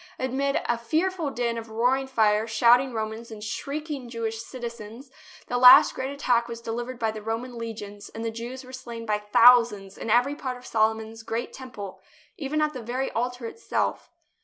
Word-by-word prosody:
Amid 270 +2 0
a 240 -1 0
fearful 320 +6 0
din 235 -3 -2
of 225 0 -10
roaring 250 +4 +1
fire, 220 -3 +2
shouting 240 +4 +4
Romans 220 0 -4
and 215 -2 -9
shrieking 280 +3 -5
Jewish 225 -1 -3
citizens, 235 +1 -8 0.3
the 245 - -1
last 255 +4 +9
great 260 +1 -3
attack 245 -4 +1
was 230 -1 -6
delivered 235 +2 -5
by 225 -2 0
the 215 0 -8
Roman 230 +3 -4
legions 210 -3 -7
and 225 +1 -6
the 225 - -1
Jews 240 +4 -7
were 255 0 -13
slain 235 -3 -7
by 210 -1 0
thousands 210 -2 +5
in - - -5
every 245 +5 +3
part 260 -4 -5
of 250 - -15
Solomon's 220 0 0
great 225 +1 -4
Temple, 205 -8 -9 0.3
even 305 +1 -2
at 305 0 0
the 255 - -6
very 250 +4 -3
altar 245 +1 -3
itself. 455 - -2
235 Hz, 180 wpm, -26 LUFS, 225-260 Hz, 0.3 s, last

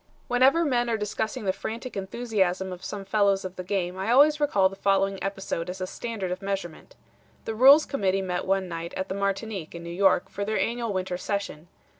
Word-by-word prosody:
"Whenever 265 +7 +4
men 245 -4 +1
are 225 - +1
discussing 215 0 -3
the 190 - +1
frantic 230 +5 -6
enthusiasm 190 -3 -1
of 180 +1 -10
some 200 -1 -5
fellows 200 -1 +2
of 185 0 -6
the 180 - -6
game 185 -1 -2
I 195 +3 -2
always 295 +5 +5
recall 205 -10 +3
the 195 - -8
following 195 0 +1
episode 195 -3 -3
as 185 +1 -6
a 185 - -2
standard 205 -2 -5
of 185 +2 -4
measurement. 195 -4 -5 0.5
The 225 - -3
Rules 270 +7 +7
Committee 195 -7 0
met 180 -1 -2
one 190 -1 +1
night 170 -1 -6
at 190 - -3
the 190 - -2
Martinique 200 -3 -3
in 170 - -7
New 170 - -6
York 190 0 +3
for 200 - -5
their 215 +1 -1
annual 235 -1 -1
winter 185 -2 -2
session. 190 -6 -4
195 Hz, 205 wpm, -26 LUFS, 185-220 Hz, 0.5 s, Rules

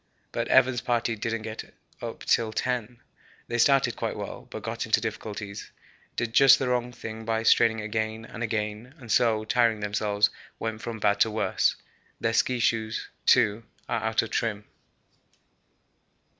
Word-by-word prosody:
But - - -2
Evans' 125 -1 +4
party 120 -1 0
didn't 115 +1 -3
get 110 0 -7 0.3
up - - -6
till 115 -2 +2
10. 120 +1 -2 0.5
They 120 - -2
started 135 +2 +4
quite - - -3
well, - - -7
but - - -7
got - - -3
into - - +3
difficulties, 105 -1 -6 0.5
did 115 -1 -2
just 135 +1 +8
the 130 - -1
wrong 125 0 0
thing 110 -2 -7
by 110 0 -1
straining 115 0 +4
again 110 +1 -3
and 120 - -9
again, 110 +3 -3
and 120 -6 -8
so, 110 -2 +3
tiring 115 -1 +2
themselves, 105 0 +1 0.3
went 110 -1 -4
from 115 0 -5
bad 100 -1 +2
to 110 - +4
worse. 105 -3 +1 0.4
Their 115 - 0
ski 125 +2 +2
shoes, 110 -1 -1 0.2
too, 105 +1 +4 0.3
are - - -1
out - - +2
of - - -7
trim. 105 -2 -1
115 Hz, 155 wpm, -27 LUFS, 110-120 Hz, 0.5 s, just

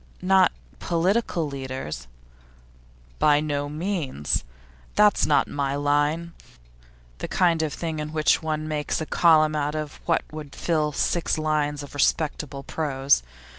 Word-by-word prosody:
'Not 185 0 +4 0.3
political 175 -1 0
leaders?' 130 - -6 1.1
'By 150 -1 +5
no 145 -1 -2
means. 150 - -2 0.5
That's 210 -1 +4
not 150 - +3
my 140 -1 -2
line. 145 +4 0 0.9
The - - -4
kind 170 -3 +2
of 155 -2 -1
thing 160 +1 -4
in 150 0 -4
which 155 -1 +2
one 155 -1 -2
makes 150 -2 -2
a 160 - -3
column 155 -2 +4
out 150 0 -1
of 155 -1 -5
what 165 - +2
would 155 -2 -8
fill 155 -3 0
six 170 +3 0
lines 150 -2 0
of 140 - -11
respectable 145 -1 0
prose. 140 - +1
155 Hz, 130 wpm, -25 LUFS, 145-165 Hz, 1.1 s, By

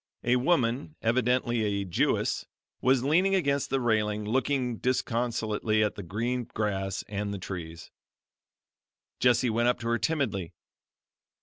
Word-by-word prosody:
A 120 +1 +3
woman 130 0 +1
evidently 120 0 +2
a 100 -2 -1
Jewess, 90 - 0 0.3
was 130 0 +3
leaning 180 +8 +3
against 140 -6 +1
the 135 - +1
railing, 105 -3 0
looking 125 +1 0
disconsolately 115 -3 0
at 105 - 0
the - - -7
green 115 +7 -2
grass 95 -2 -1
and 100 0 -3
the 100 - -3
trees. 85 -3 -7 1.3
Jessie 125 -1 +3
went 120 +2 +2
up 125 - +2
to 115 - -4
her 115 0 +1
timidly. 120 - -1
115 Hz, 130 wpm, -28 LUFS, 105-125 Hz, 1.3 s, A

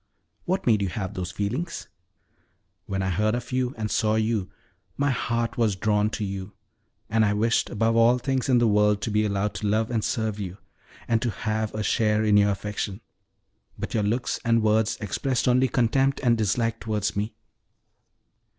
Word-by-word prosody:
"What 190 +2 -1
made 110 -4 +3
you 100 - 0
have 95 +2 -4
those 90 -1 -4
feelings?" 125 - -3 1.0
"When 95 -1 -2
I 95 - 0
heard 105 +5 +1
of 120 +1 -5
you, 130 0 -1
and 110 -1 -3
saw 110 0 +2
you, 110 -3 0 0.5
my 145 0 +2
heart 120 -1 -1
was 110 -4 +2
drawn 105 +2 +1
to 110 -1 -3
you, 95 0 -6 0.5
and 110 0 +2
I 105 -1 +2
wished 115 +3 +1
above 115 +2 +1
all 115 +2 +5
things 130 +1 -1
in 125 - +5
the 120 -1 +4
world 105 -1 +3
to 110 - -2
be 105 +1 +2
allowed 100 +1 -1
to 105 - -2
love 110 +3 +1
and 115 -3 0
serve 110 -2 -1
you, 95 -2 -5 0.5
and 115 -1 +2
to 120 - 0
have 110 0 -2
a 110 - -2
share 105 0 +2
in 105 -1 +3
your 105 0 +5
affection; 100 0 -3 0.8
but - - -5
your 110 - +1
looks 115 +4 -1
and 115 -1 +2
words 110 0 +2
expressed 120 +6 -1
only 125 +1 +4
contempt 135 +4 +1
and 120 -2 +4
dislike 115 +1 0
towards 105 -2 -2
me. 105 +2 -2
110 Hz, 185 wpm, -25 LUFS, 105-115 Hz, 1.0 s, all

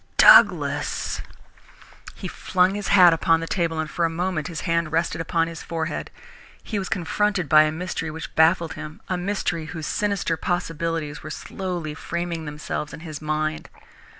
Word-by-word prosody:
"Douglas!" - - +5 0.9
He - - -6
flung 185 +1 +1
his 205 0 -4
hat 180 -3 +7
upon 165 0 +3
the 165 - -4
table 165 -2 -1
and 160 - -1
for 170 +4 -2
a 165 - +3
moment 165 -2 -2
his 165 -3 -5
hand 170 -2 0
rested 165 0 0
upon 165 0 +1
his 165 -1 -7
forehead. 165 -1 -4 0.5
He 210 - -3
was 190 - -4
confronted 195 -2 0
with 155 0 +8
a - - -1
mystery 165 0 -4
which 160 +1 -7
baffled 165 +1 +3
him, 155 0 -8
a 185 - +1
mystery 180 -3 -2
whose 160 -1 -6
sinister 200 -5 -1
possibilities 165 -3 -2
were - - -8
slowly 175 -5 -5
framing 170 +1 -4
themselves 150 0 -5
in - - -12
his 155 -3 -7
mind. 155 0 -2
165 Hz, 165 wpm, -24 LUFS, 155-180 Hz, 0.9 s, with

